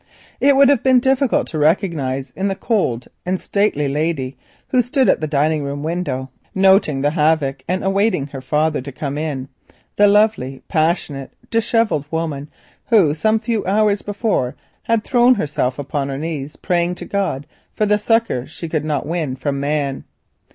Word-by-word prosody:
It 280 0 +4
would 275 0 +6
have 280 -5 +3
been 260 -1 +5
difficult 265 0 +2
to 155 - -3
recognise 145 -6 0
in 195 +2 -1
the 195 - -1
cold 190 - -1 0.2
and 185 +1 -1
stately 200 -8 0
lady 140 -2 -1 0.3
who 255 - +4
stood 255 +2 +1
at - - +3
the 155 - -1
dining 150 +1 +1
room 140 0 -4
window, 155 -6 -3 0.2
noting 190 -7 +4
the 145 +1 +2
havoc 150 -4 +1
and 185 +2 -1
waiting 200 -8 +1
for 140 - -14
her 135 - -6
father 150 +2 0
to 140 +2 -8
come 140 +1 -4
in, 145 -4 -3 0.5
the 205 - +6
lovely, 205 -11 +2
passionate, 155 -4 -1 0.2
dishevelled 225 - +1
woman 155 -3 -3 0.4
who 195 -11 +4
some 215 +8 +1
few 225 -1 -1
hours 205 +1 +2
before 205 - -1 0.3
had 230 -2 0
thrown 245 +1 +4
herself 145 - -1
upon 140 0 -3
her 135 - -3
knees 150 -2 -5
praying 175 -1 0
to - - -8
God 190 -9 -2 0.3
for 215 - 0
the 210 0 +2
succour 225 - +1
she 160 +2 -7
could 155 -2 -1
not 150 -3 -2
win 155 -4 -2
from 140 +2 -2
man. 140 -1 -1
160 Hz, 170 wpm, -19 LUFS, 140-205 Hz, 0.5 s, would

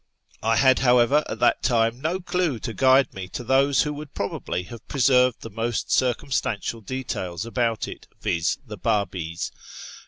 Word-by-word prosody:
I 115 +1 +2
had, 130 +2 +5
how 125 -1 +4
ever, 135 +6 +4
at - - -4
that - - +3
time 115 0 +1
no 165 +5 -1
clue 180 -6 -1
to 115 - -4
guide 130 +2 +4
me 95 -1 -6
to 105 - -6
those 135 +2 +3
who 150 - -3
would 150 0 -9
probably 100 -2 -3
have 115 +5 -11
preserved 125 -3 +3
the 115 - -8
most 115 +2 -2
circumstantial 120 -3 0
details 105 -6 -4
about 115 -2 -1
it, - - -10
viz. 85 0 0
the 105 -3 -8
Babis. 90 -5 -2
120 Hz, 165 wpm, -24 LUFS, 110-135 Hz, -, had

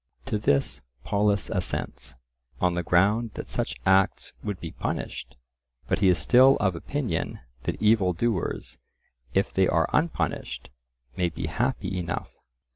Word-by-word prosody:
To 115 -6 -1
this 70 -9 +1 0.2
Polus 100 -1 +1
assents, - - -3 0.4
on 90 -1 +2
the 90 - 0
ground 100 +7 +2
that - - -6
such 65 - -2
acts 95 0 +2
would 100 -3 -3
be 80 - -6
punished, 60 0 -4 0.5
but - - +1
he 100 - +4
is 90 -1 +5
still 130 +2 +6
of 95 -5 +1
opinion 135 - -3 0.3
that - - -2
evil 105 -4 +4
doers, 95 +1 -2 0.6
if 95 - +1
they 95 -1 +3
are 80 +1 +2
unpunished, 165 +2 -1 0.5
may 90 -1 +2
be 85 - -5
happy 100 0 -1
enough. 85 -2 -4
95 Hz, 140 wpm, -26 LUFS, 85-110 Hz, 0.6 s, still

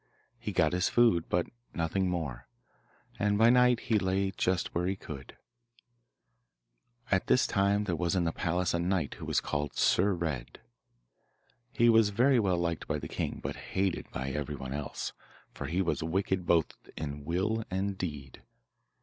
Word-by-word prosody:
He 110 - -4
got 85 -4 +2
his 90 0 +2
food, 115 -9 +3
but 85 0 +1 0.3
nothing 90 +3 0
more, 70 -9 -4 0.7
and 105 0 +2
by 115 +2 +6
night 125 -1 +4
he 110 -2 +1
lay 95 +1 0
just 95 -1 -1
where 90 +1 0
he 95 - 0
could. 70 -7 -9 1.7
At 95 -1 +2
this 125 - +4
time 100 +1 +2
there 90 -4 -1
was 85 +2 0
in 90 - +2
the 85 - +1
palace 90 +1 0
a 85 - +1
knight 90 -3 0
who - - -6
was - - +1
called 70 0 -3
Sir 95 +1 +3
Red. 80 -7 -4 1.1
He 120 -2 +3
was 110 -2 +6
very 125 +5 +4
well 95 -5 +2
liked 85 -1 -2
by - - 0
the - - -6
king, - - -3
but - - -3 0.2
hated 95 -2 0
by 65 +1 -4
everyone 70 -1 -4
else, 75 0 -4 0.4
for 70 - -5
he 90 +6 0
was 85 - -1
wicked 95 +2 -1
both 85 -2 +2 0.2
in 75 -1 -5
will 95 +8 0
and 95 +1 -1
deed. 75 -8 -6
90 Hz, 165 wpm, -30 LUFS, 80-100 Hz, 1.7 s, by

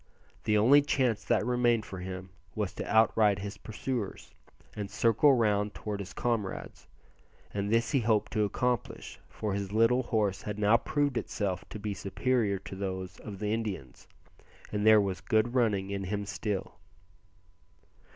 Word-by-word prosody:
The 105 - +3
only 130 +8 +6
chance 125 -7 +1
that - - +2
remained 120 -2 +2
for 95 - -7
him 95 0 -7 0.2
was 105 -3 -2
to - - -5
outride 110 -2 +4
his 100 +1 -6
pursuers, 110 -1 -5 0.4
and 105 -2 -4
circle 115 +7 +4
round 105 -3 +1
towards 105 -2 -4
his 95 -1 -8
comrades, 115 -6 -3 0.7
and 100 0 -2
this 115 +1 +2
he 140 - +3
hoped 110 -2 +1
to 110 -2 +2
accomplish, 125 +4 -2
for 105 -3 -3
his 100 -1 -3
little 115 +4 +4
horse 105 -6 0
had 105 0 -5
now 105 +2 +4
proved 145 +2 0
itself 95 -4 -3
to - - -6
be 105 0 -3
superior 100 +1 0
to 95 - -9
those 95 -1 -5
of 105 -3 -8
the 105 +2 -1
Indians, 100 - -5 0.6
and 105 0 0
there 110 -1 +8
was 95 -2 -1
good 115 +1 +1
running 105 -6 +1
in 100 -1 -3
him 100 +2 -2
still. 100 -3 -4
105 Hz, 160 wpm, -30 LUFS, 100-115 Hz, 0.7 s, there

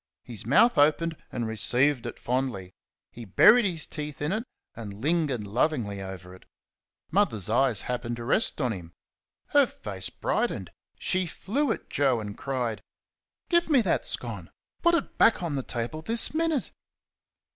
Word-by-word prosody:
His 115 -3 -6
mouth 150 - +5
opened 160 +3 +3 0.2
and 120 -3 -3
received 125 +4 +2
it - - -7
fondly. 120 -8 -2 0.4
He 120 - -10
buried 210 - +6
his 170 -5 -1
teeth 150 -2 -7
in 150 +2 -1
it 220 +4 -2 0.3
and 105 -4 -7
lingered 140 -2 0
lovingly 105 -2 -1
over 95 -1 -8
it. 95 - -16 0.7
Mother's 110 - +1
eyes 120 -3 +2
happened 120 -1 -3
to 120 - -7
rest 150 - +2
on 125 -5 0
him. 85 -3 -10 0.6
Her 285 -3 +5
face 95 - -4
brightened. - - -2 0.3
She 185 -1 +1
flew 255 - -1
at - - -4
Joe 135 -4 +1
and 105 -2 -6
cried: 125 -5 -3 0.7
"Give 345 -1 +2
me 280 -5 +5
that - - 0
scone! - - -4 0.3
put 340 0 +4
it - - -3
back 225 -5 +5
on 165 -4 -2
the 135 - -1
table 125 +5 -4
this 225 - +1
minute!" 320 -3 0
135 Hz, 155 wpm, -27 LUFS, 110-180 Hz, 0.7 s, buried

